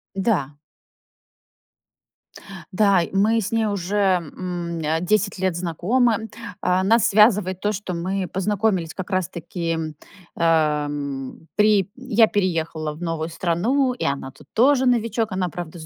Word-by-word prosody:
Да. 190 - 0 2.2
Да, 200 -2 +4
мы 215 +4 +2
с 205 - -4
ней 225 -1 +1
уже, 200 -2 -2
м, 175 -2 -1
э, 160 +1 -1
10 200 +2 +1
лет 185 -3 0
знакомы. 220 +7 0 0.3
А, 180 +1 +2
нас 225 +4 +4
связывает 205 -3 +4
то, 210 +2 0
что 195 -2 -5
мы 185 +2 -2
познакомились 195 -3 0
как 190 0 -6
раз-таки, 170 -2 -2 0.6
эм, 150 -3 -1
при 210 -2 +3
я 240 -4 +3
переехала 165 -6 -1
в 155 - -13
новую 165 -2 -2
страну, 190 - 0
и 250 - -4
она 140 -1 -2
тут 135 +2 -19
тоже 265 +3 +4
новичок. 230 -3 +1
Она, 185 -1 -1
правда, 175 0 -7
с 155 - -9
185 Hz, 130 wpm, -22 LUFS, 165-210 Hz, 2.2 s, Да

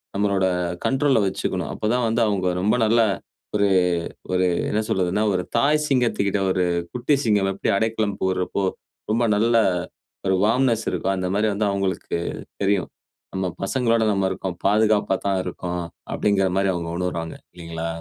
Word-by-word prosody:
நம்மளோட 100 -1 +1 0.4
கண்ட்ரோல்ல 135 -2 +3
வச்சிக்கணும். 95 - -2
அப்ப - - -5
தான் 125 -1 +1
வந்து 115 +1 +1
அவுங்க 95 -3 0
ரொம்ப 105 +5 +2
நல்ல 115 +2 +3 0.6
ஒரு 100 -1 +3 0.6
ஒரு 90 0 +3 0.2
என்ன 105 - +1
சொல்வதுன்னா, 95 +3 +1
ஒரு 90 - 0
தாய் 150 +4 +3
சிங்கத்துக்கிட்ட 115 -7 +1
ஒரு 90 -1 +1 0.3
'குட்டி 125 +4 +2
சிங்கம்' 100 -3 +2
எப்டி 95 - -1
அடைக்கலம் 110 -2 0
புகுறப்போ 95 +1 0 0.5
ரொம்ப 115 +2 +2
நல்லா 115 +1 +4 0.6
ஒரு 95 - +3
வார்ம்னெஸ் 115 0 +2
இருக்கோ, - - -1
அந்த 90 0 -1
மாரி 110 +1 +2
வந்து 105 +1 0
அவுங்களுக்கு 95 -3 -2 0.5
தெரியும். 95 -5 +1 0.4
நம்ம 95 -1 -1 0.2
பசங்களோட 115 +2 +1
நம்ம 95 -1 +1
இருக்கோம், 90 -2 -4
பாதுகாப்பா 105 -1 +3
தான் 95 -1 +1
இருக்கோம் 90 -1 -4 0.3
அப்டிங்குற 95 -2 +2
மாரி 95 -1 +2
அவுங்க 85 -1 -4
உணர்வாங்க, 85 -2 -3 0.2
இல்லைங்களா? 85 -1 -5
100 Hz, 145 wpm, -23 LUFS, 95-115 Hz, 0.6 s, நல்லா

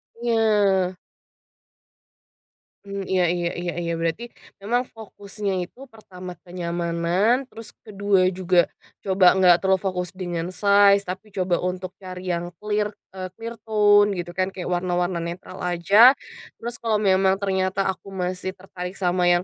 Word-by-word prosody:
Iya. 210 -6 +2 1.9
Mhm, 200 0 -5
iya 185 -2 +3
iya 175 -1 -1
iya 175 -1 -3
iya 170 0 -2
berarti, 165 +7 -2 0.4
memang 240 +5 0
fokusnya 205 -3 -6
itu 265 +7 -15
pertama 185 -5 -10
kenyamanan, 175 +7 0
terus 225 0 -9
ke-2 200 -3 +1
juga 180 -1 +2 0.3
coba 190 -2 +5
nggak 180 -2 +5
terlalu 190 -1 +2
fokus 180 -2 -2
dengan 175 -1 -4
size, 200 0 +5
tapi 195 +2 -7
coba 180 -2 0
untuk 180 0 -3
cari 185 -1 -8
yang 175 0 -3
clear, 210 0 -1 0.2
e 185 -1 -6
clear 230 +2 -8
tone 205 -1 +4
gitu 175 -1 -5
kan, 185 +1 0
kayak 180 -1 -5
warna-warna 175 0 0
netral 170 +2 -6
aja. 200 +9 +6 0.5
Terus 240 +1 -4
kalo 220 -2 0
memang 190 0 +3
ternyata 190 0 0
aku 195 +1 -6
masih 185 0 -3
tertarik 185 -1 -8
sama 180 -2 0
yang, 175 0 +3
190 Hz, 140 wpm, -23 LUFS, 180-205 Hz, 1.9 s, aja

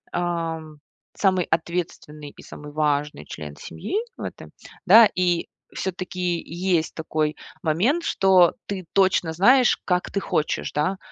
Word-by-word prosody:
ам, 165 -3 -3 0.4
самый 185 -3 +2
ответственный 160 -3 -3
и - - -12
самый 150 0 -10
важный 150 - -1
член 75 -1 -8
семьи 80 - -6 0.2
в - - -10
этом, - - -8 0.3
да, 215 +3 +8
и 175 -2 +1 0.3
все-таки 180 -2 -3
есть 175 -1 -1
такой 155 -1 -2 0.3
момент, 210 - +1
что 190 - +4
ты 190 -3 -5
точно 190 -4 +2
знаешь, 245 +9 +4
как 180 -1 0
ты 200 - -1
хочешь, 155 -5 -1
да, 155 +6 -1
175 Hz, 130 wpm, -23 LUFS, 155-190 Hz, 0.4 s, да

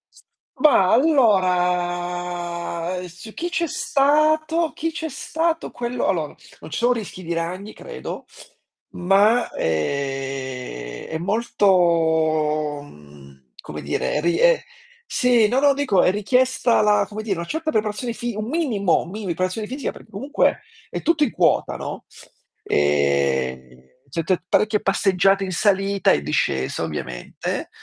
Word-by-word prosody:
S - - -20 0.4
ma 235 -12 +5
allora, 180 - +1
su 180 +5 -12
chi 345 - -3
c'è 345 -1 0
stato 310 +3 +2
chi 325 +1 -3
c'è 320 0 -4
stato 325 +4 -2
quello, 240 0 -3
allora, 160 -5 -1 0.2
non 155 - -11
ci - - -3
sono 240 +1 +3
rischi 205 -5 -7
di 170 0 -3
ragni, 180 +5 -4
credo, - - -8 0.7
ma 200 +6 +3
ehm, 130 - -3
è 160 - -2
molto, 160 -7 +1
mhmm, 70 - -17
come - - -8
dire, 150 - -1
ri 170 +2 +1
e - - +4 0.4
Sì, 245 -4 +3
no 250 +5 +1
no 285 0 +5
dico 270 -9 +2
è - - +4
richiesta 250 +4 +2
la, 210 -1 +3
come 215 +1 -6
dire, 200 -4 -2
una 170 - -4
certa 315 - -2
preparazione 215 +1 -1
fi 240 -1 -4
un 215 +1 -4
minimo, 240 - +1
mini 205 +4 -7
preparazione 185 +4 -2
fisica, 265 +3 -4
per - - -14
comunque 225 +8 0 0.3
è - - -4
tutto 320 -2 +2
in 265 - +1
quota, - - +2
no, - - -6 0.6
ehm, 70 -3 0 0.3
setté 165 +4 -1
parecchie 210 +2 +2
passeggiate 195 0 +2
in 190 - -3
salita 195 +1 +2
e - - +2
discesa, 65 +1 -1
ovviamente, 65 -6 -5
190 Hz, 135 wpm, -22 LUFS, 160-240 Hz, 0.7 s, ma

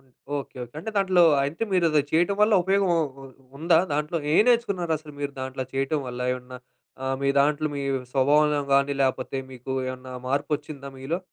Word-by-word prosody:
Okay. - - -28 0.3
Okay. 135 -2 -7 0.2
అంటే 195 +8 -5
దాంట్లో, 190 -3 +4 0.2
అంటే 150 +9 -4
మీరది 165 -5 +3
చేయటం 175 +5 +2
వల్ల 210 +1 +5
ఉపయోగం 195 +1 +2
ఉ - - +2 0.2
ఉ - - -10 0.3
ఉందా 165 +1 +4
దాంట్లో? 150 +3 -1 0.2
ఏం - - +7
నేర్చుకున్నారసలు 175 -10 0
మీరు 145 0 -3
దాంట్లో 130 0 -4
చేయటం 135 +3 0
వల్ల? 125 0 -6
ఏమన్నా 125 0 -8 0.5
ఆహ్, 135 0 -1
మీ 140 - +2
దాంట్లో 150 +2 +2
మీ 140 - -3 0.3
స్వభావంలో 145 +2 +3
గానీ, 140 +1 +3
లేపోతే 130 0 -1 0.2
మీకు 125 +1 -9 0.2
ఏమన్నా 130 0 -7 0.2
మార్పొచ్చిందా 145 0 -2
మీలో? 140 +6 -2
150 Hz, 165 wpm, -25 LUFS, 135-170 Hz, 0.5 s, ఏం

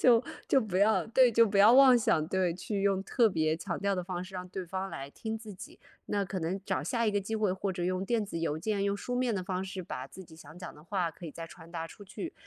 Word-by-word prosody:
就 240 -1 +5 0.2
就 270 - +5
不 200 -5 -2
要 210 +2 +3
对， 250 +2 +5
就 230 0 +5
不 200 -1 0
要 210 +4 +8
妄 260 -1 +8
想， 160 -9 +2
对， 180 -1 0
去 200 +3 -3
用 195 -1 +1
特 235 0 +3
别 155 -5 +1
强 170 +1 -4
调 200 0 0
的 180 - -2
方 180 0 -4
式 190 +1 -12
让 180 0 -5
对 190 0 -5
方 190 +2 -4
来 140 -3 -7
听 220 +6 -5
自 220 -1 -9
己。 185 - -11 0.3
那 205 -1 0
可 190 0 -4
能 180 +4 -2
找 130 - -1
下 230 +8 0
一 215 - +3
个 205 - +1
机 220 +3 -3
会， 210 -3 +1
或 190 +1 -2
者 175 -1 -3
用 185 +1 -1
电 225 0 0
子 170 - -5
邮 160 -2 -1
件， 200 +3 -1
用 200 0 0
书 245 - -4
面 245 -2 +1
的 185 - -3
方 185 0 -2
式， 190 -1 -5
把 130 -5 -6
自 190 - -11
己 160 - -15
想 160 +1 -13
讲 180 -4 -8
的 150 - -15
话 175 -1 -1
可 175 - -10
以 - - -6
再 165 +2 -8
传 165 0 -14
达 165 -1 -4
出 205 - -13
去。 265 - -7
190 Hz, 305 characters per minute, -30 LUFS, 175-215 Hz, 0.3 s, 要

